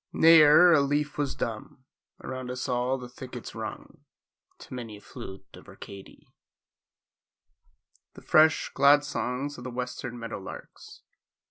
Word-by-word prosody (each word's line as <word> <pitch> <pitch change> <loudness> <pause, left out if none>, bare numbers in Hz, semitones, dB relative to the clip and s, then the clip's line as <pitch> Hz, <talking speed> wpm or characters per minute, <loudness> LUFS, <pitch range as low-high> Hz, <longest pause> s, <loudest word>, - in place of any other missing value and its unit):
"N'er 165 +1 +7
a 150 - +5
leaf 145 +1 -1
was 140 -2 -1
dumb; 115 +3 -6 0.4
Around 130 -1 -6
us 125 0 -4
all 125 +1 0
the 125 -1 -9
thickets 125 +1 -9
rung - - -8 0.5
To - - -13
many 115 -4 -7
a - - -15
flute 95 -1 -11
of - - -14
Arcady." 100 -1 -13 1.9
The - - -13
fresh, 160 +1 +3
glad 140 +1 +5
songs 140 +1 -4
of - - -10
the 125 - -6
western 125 0 -6
meadow 115 -2 -6
larks! 95 - -12
130 Hz, 135 wpm, -27 LUFS, 120-145 Hz, 1.9 s, N'er